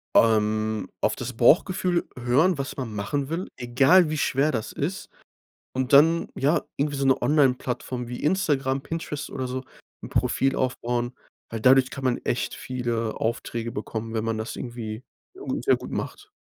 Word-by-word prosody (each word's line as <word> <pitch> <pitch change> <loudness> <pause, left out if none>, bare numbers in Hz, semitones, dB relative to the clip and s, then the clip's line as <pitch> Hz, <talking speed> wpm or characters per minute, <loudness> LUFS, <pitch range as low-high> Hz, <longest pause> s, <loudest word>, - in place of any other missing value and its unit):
Ähm, 110 -1 +3
auf 110 - +1
das 125 +1 -5
Bauchgefühl 175 - +3
hören, 135 +9 +3
was 140 0 -4
man 125 -5 -4
machen 135 +8 -2
will, 165 +5 -3
egal 135 +8 +4
wie 155 - -2
schwer 140 +1 +2
das 110 -2 -2
ist. 170 +7 -4 0.7
Und 130 +1 -1
dann, 160 +4 +6
ja, 145 +5 +2 0.2
irgendwie 145 0 0
so 135 - -1
'ne 130 - +3
Onlineplattform 130 -3 +1
wie 125 - -6
Instagram, 145 -6 +1
Pinterest 150 0 -5
oder 130 -1 -3
so, 130 +1 -4 0.4
'n - - -7
Profil 135 0 +1
aufbauen, 120 -1 -1 0.4
weil 115 - -4
dadurch 130 +2 +5
kann 140 - -7
man 125 -2 +2
echt 120 - -1
viele 120 -3 -3
Aufträge 115 0 -2
bekommen, 110 +1 -5
wenn 110 0 -1
man 115 -1 -1
das 110 +1 -5
irgendwie 120 -1 -6 0.3
gu 390 - -3
sehr - - +4
gut - - -9
macht. 415 - -5
130 Hz, 165 wpm, -25 LUFS, 115-145 Hz, 0.7 s, dann